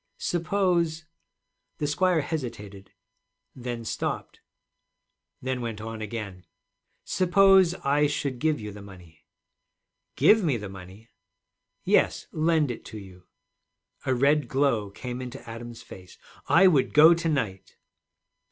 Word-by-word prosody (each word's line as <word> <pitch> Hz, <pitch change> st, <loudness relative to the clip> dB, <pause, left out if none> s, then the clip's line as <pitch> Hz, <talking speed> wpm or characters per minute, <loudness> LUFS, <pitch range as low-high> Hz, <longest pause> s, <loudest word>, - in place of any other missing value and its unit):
'Suppose,' 170 Hz, -2 st, 0 dB, 0.7 s
the 150 Hz, -, -2 dB
squire 170 Hz, +3 st, +2 dB
hesitated, 105 Hz, -, -6 dB, 0.6 s
then 120 Hz, -2 st, -6 dB
stopped, -, -, -4 dB, 1.0 s
then 130 Hz, -1 st, -2 dB
went 115 Hz, -3 st, -5 dB
on 110 Hz, 0 st, -7 dB
again, 105 Hz, -4 st, -6 dB, 0.6 s
'suppose 190 Hz, -1 st, +4 dB
I 145 Hz, +2 st, +3 dB
should 140 Hz, -3 st, -3 dB
give 155 Hz, +1 st, +1 dB
you 105 Hz, -1 st, -7 dB
the 100 Hz, 0 st, -11 dB
money?' 85 Hz, -5 st, -15 dB, 0.9 s
'Give 205 Hz, -, +5 dB
me 145 Hz, -8 st, +1 dB
the 105 Hz, -2 st, -7 dB
money!' 95 Hz, +4 st, -12 dB, 0.7 s
'Yes, -, -, +2 dB
lend 155 Hz, -3 st, +1 dB
it 120 Hz, -, -8 dB
to 110 Hz, -, -9 dB
you?' 95 Hz, -3 st, -13 dB, 0.8 s
A 130 Hz, -, 0 dB
red 140 Hz, +2 st, +2 dB
glow 125 Hz, -6 st, +1 dB
came 125 Hz, +5 st, -7 dB
into 125 Hz, +1 st, -9 dB
Adam's 115 Hz, 0 st, -9 dB
face. 90 Hz, -1 st, -13 dB, 0.3 s
'I 190 Hz, +4 st, +5 dB
would 150 Hz, -8 st, +3 dB
go 160 Hz, +3 st, +8 dB
to 170 Hz, 0 st, -1 dB
night.' 110 Hz, -11 st, -3 dB
130 Hz, 125 wpm, -26 LUFS, 105-155 Hz, 1.0 s, go